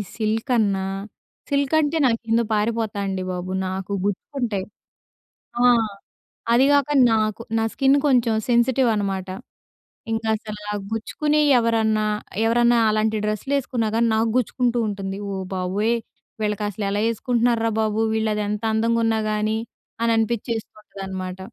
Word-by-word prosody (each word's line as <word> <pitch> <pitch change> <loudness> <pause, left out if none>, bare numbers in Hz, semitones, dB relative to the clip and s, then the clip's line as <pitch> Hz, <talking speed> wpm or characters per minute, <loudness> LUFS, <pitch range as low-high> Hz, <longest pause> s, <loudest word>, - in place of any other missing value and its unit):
Silk 220 +1 -1
అన్న, 200 -3 +2 0.7
silk 280 0 0
అంటే 310 +1 +1
నాకింద 230 -1 +1
పారిపోతా 215 0 -1
అండి 190 -1 -2
బాబు. 180 0 -4 0.2
నాకు 190 +1 -5
గుచ్చుకుంటాయి. 205 0 -2 1.0
ఆ! - - +4 0.9
అది 250 +3 +5
కాక 285 -1 +3 0.2
నాకు 215 0 0 0.2
నా 225 - +1
స్కిన్ 270 +1 +3
కొంచెం 245 -4 +3 0.2
సెన్సిటివ్ 245 +1 +3
అనమాట. 195 -2 -2 0.8
ఇంకా 225 0 -2
అసల 215 -1 -7 0.3
గుచ్చుకునెయి 295 +7 +1
ఎవరన్నా, 220 -2 +1 0.4
ఎవరన్నా 240 +1 +4
అలాంటి 215 0 +1
డ్రెస్‌లు 215 +6 -2
వేసుకున్నా 240 -4 -1
కానీ 230 +1 +3
నాకు 225 +1 +2
గుచ్చుకుంటూ 245 0 0
ఉంటుంది. 195 -1 -4 0.2
"ఓ - - -3 0.2
బాబోయ్! 195 +5 0 0.5
వీళ్ళకి 210 -1 -1
అసలు 205 +1 -4
ఎలా 205 +1 0
వేసుకుంటున్నార్రా 230 0 +1
బాబు 215 0 0
వీళ్ళు, 220 0 0
అది 210 - -1
ఎంత 210 +1 -3
అందంగా 230 +1 +2
ఉన్నా 225 -1 +1
కానీ," 215 +1 0 0.4
అని 230 0 +2
అనిపించేస్తుంటుందనమాట. 205 -5 -4
220 Hz, 130 wpm, -22 LUFS, 210-235 Hz, 1.0 s, అది